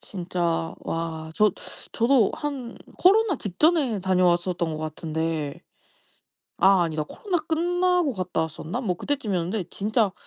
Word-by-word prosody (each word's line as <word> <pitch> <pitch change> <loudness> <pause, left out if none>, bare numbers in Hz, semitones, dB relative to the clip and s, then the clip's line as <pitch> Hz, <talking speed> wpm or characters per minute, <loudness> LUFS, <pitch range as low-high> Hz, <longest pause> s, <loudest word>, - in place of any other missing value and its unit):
진짜 175 -3 -2
와 160 -1 -4
저 210 0 +4 0.4
저도 235 -2 +3
한 270 -5 -5 0.2
코로나 400 -1 +4
직전에 255 - +1
다녀왔었던 180 -2 +1
것 155 - -4
같은데 155 -1 -3 1.0
아 190 -1 +5
아니다 155 -2 -1
코로나 365 - -2
끝나고 350 0 +1
갔다 185 -4 -2
왔었나? 160 - -4
뭐 185 -8 -1
그때쯤이었는데 205 -8 -2
진짜 210 -1 +1
190 Hz, 275 characters per minute, -25 LUFS, 165-275 Hz, 1.0 s, 아